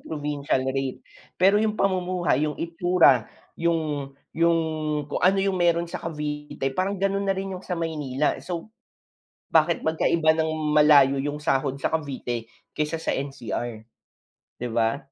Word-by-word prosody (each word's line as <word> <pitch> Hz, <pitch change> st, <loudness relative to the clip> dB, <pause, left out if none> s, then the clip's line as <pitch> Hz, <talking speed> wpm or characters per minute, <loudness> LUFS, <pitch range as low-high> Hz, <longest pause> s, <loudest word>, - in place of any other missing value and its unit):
provincial 145 Hz, -3 st, -2 dB
rate. 135 Hz, -1 st, -3 dB, 0.3 s
Pero 195 Hz, +3 st, +4 dB
yung 215 Hz, -1 st, 0 dB
pamumuhay, 180 Hz, -7 st, +1 dB
yung 150 Hz, -, -5 dB
itsura, 170 Hz, -, +3 dB, 0.3 s
yung 155 Hz, -5 st, -1 dB, 0.2 s
yung 170 Hz, 0 st, +3 dB, 0.5 s
kung -, -, -2 dB
ano 185 Hz, +3 st, +4 dB
yung 195 Hz, -1 st, 0 dB
meron 170 Hz, -1 st, +3 dB
sa -, -, -5 dB
Cavite, 150 Hz, -3 st, -4 dB
parang 190 Hz, +6 st, -1 dB
ganun 195 Hz, +1 st, 0 dB
na 195 Hz, -, +3 dB
rin 195 Hz, 0 st, -4 dB
yung 180 Hz, -, -6 dB
sa 180 Hz, -, -2 dB
Maynila. 150 Hz, -4 st, -1 dB
So, 175 Hz, +4 st, -6 dB, 0.8 s
bakit 165 Hz, +1 st, +3 dB
magkaiba 160 Hz, 0 st, +3 dB
nang 160 Hz, 0 st, 0 dB, 0.3 s
malayo 145 Hz, -3 st, +6 dB
yung 145 Hz, +1 st, -3 dB
sahod 135 Hz, -2 st, 0 dB
sa 140 Hz, -, -1 dB
Cavite 125 Hz, -6 st, -4 dB, 0.3 s
kaysa 150 Hz, +2 st, -1 dB
sa -, -, -1 dB
NCR? 120 Hz, -4 st, -5 dB, 0.7 s
'Di 125 Hz, -, -3 dB
ba. 115 Hz, +3 st, +1 dB
155 Hz, 145 wpm, -25 LUFS, 140-175 Hz, 0.8 s, malayo